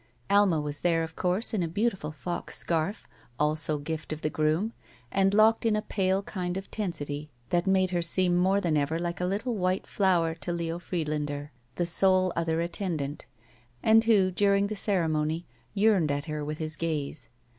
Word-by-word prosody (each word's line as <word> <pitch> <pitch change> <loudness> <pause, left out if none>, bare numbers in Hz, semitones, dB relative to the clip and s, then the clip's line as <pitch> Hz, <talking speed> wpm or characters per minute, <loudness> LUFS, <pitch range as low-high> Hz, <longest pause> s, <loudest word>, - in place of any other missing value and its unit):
Alma 200 -5 +4
was 145 -1 -2
there, 165 -2 +2
of 160 0 -7
course, 185 +6 +1
in 210 - +1
a 170 - 0
beautiful 190 -3 -1
fox 175 +4 -4
scarf, 170 +4 -1 0.3
also 155 0 +2
gift 155 +2 -5
of 155 0 -5
the 155 - 0
groom, 155 +9 0 0.4
and 195 0 +3
locked 215 +2 +4
in 225 -2 +2
a 215 - 0
pale 190 0 0
kind 180 -2 -4
of 195 - -7
tensity 150 -7 -4 0.2
that 175 +2 +1
made 190 -1 +3
her 175 -1 0
seem 175 +1 +2
more 190 +3 +3
than 170 -5 0
ever 150 +2 0
like 170 +1 -3
a - - +1
Uttle 205 +7 -1
white 185 -2 0
flower 175 -5 +2
to 165 +2 -4
Leo 170 0 -3
Friedlander, 150 -4 -3 0.2
the 175 - 0
sole 185 +1 +3
other 165 0 0
attendant, 165 -5 -3 0.6
and 225 +1 +5
who 200 -5 +4
during 200 +1 +3
the 215 +1 -3
ceremony 165 -5 0 0.3
yearned 200 -6 +3
at 145 +1 -1
her 155 -2 -4
with 150 +1 -4
his 155 0 -2
gaze. 155 -2 -3
175 Hz, 180 wpm, -28 LUFS, 155-195 Hz, 0.6 s, and